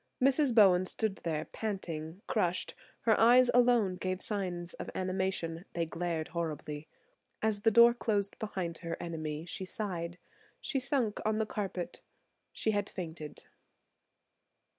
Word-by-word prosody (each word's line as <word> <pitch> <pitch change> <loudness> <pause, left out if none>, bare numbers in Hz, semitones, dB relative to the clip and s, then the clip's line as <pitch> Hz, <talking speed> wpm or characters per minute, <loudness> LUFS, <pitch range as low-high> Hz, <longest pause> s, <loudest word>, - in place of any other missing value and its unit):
Mrs. 270 -1 +3
Bowen 185 -4 +6
stood 215 -2 -1
there 160 -2 -2
panting, 180 -4 -5
crushed; 180 -4 0 0.3
her 220 -2 +4
eyes 245 +2 +7
alone 240 -6 +4
gave 185 0 -2
signs 180 -5 -3
of - - -7
animation; 185 -3 -1
they 170 -1 0
glared 165 -1 -3
horribly. 155 -3 -4 0.6
As 215 -2 +1
the 225 - +5
door 235 +2 +8
closed 205 -4 -1
behind 185 -6 -3
her 170 -1 -4
enemy 155 -2 -4
she 180 - -5
sighed; 180 -3 -4 0.4
she 275 - -1
sunk 255 -5 0
on 215 0 +1
the 220 - +1
carpet. 195 -4 -4 0.5
She 220 - 0
had 205 -1 -1
fainted. 160 -5 -7
190 Hz, 135 wpm, -32 LUFS, 170-220 Hz, 0.6 s, door